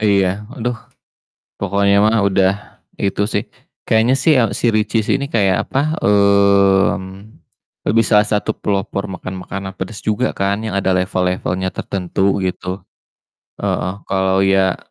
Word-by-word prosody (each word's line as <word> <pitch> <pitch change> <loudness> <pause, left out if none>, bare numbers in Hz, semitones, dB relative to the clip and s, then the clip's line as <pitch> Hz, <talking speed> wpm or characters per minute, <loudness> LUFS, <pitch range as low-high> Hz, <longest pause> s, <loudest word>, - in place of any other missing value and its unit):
Heeh, 100 -2 +3
iya 90 - +1 0.3
aduh. 120 0 -2 0.8
Pokoknya 100 +1 +2
mah 110 0 +3
udah 95 -1 +3 0.5
itu 100 +1 0
sih, 105 -1 -3 0.4
kayaknya 110 +3 +3
sih 135 +2 +3
ya, 115 -2 +2
si 120 - +1
Richeese 110 0 +1
ini 140 - -3
kayak 100 -8 +1
apa, 155 +4 -1
mmm, 100 0 +2 0.6
lebih 115 +1 +3
salah 105 -2 +4
satu 105 +1 0
pelopor 100 0 -3
makan 95 0 -6
makanan 95 0 -6
pedas 95 +3 -7
juga 110 +4 0
kan, 100 +2 0
yang 105 -3 -2
ada 95 -1 +1
level-levelnya 90 0 -1
tertentu 95 +1 -1
gitu, 90 +1 -4 0.8
heeh. 90 - -1 0.2
Kalo 95 0 +1
ya 95 -1 +2
100 Hz, 135 wpm, -18 LUFS, 95-110 Hz, 0.8 s, salah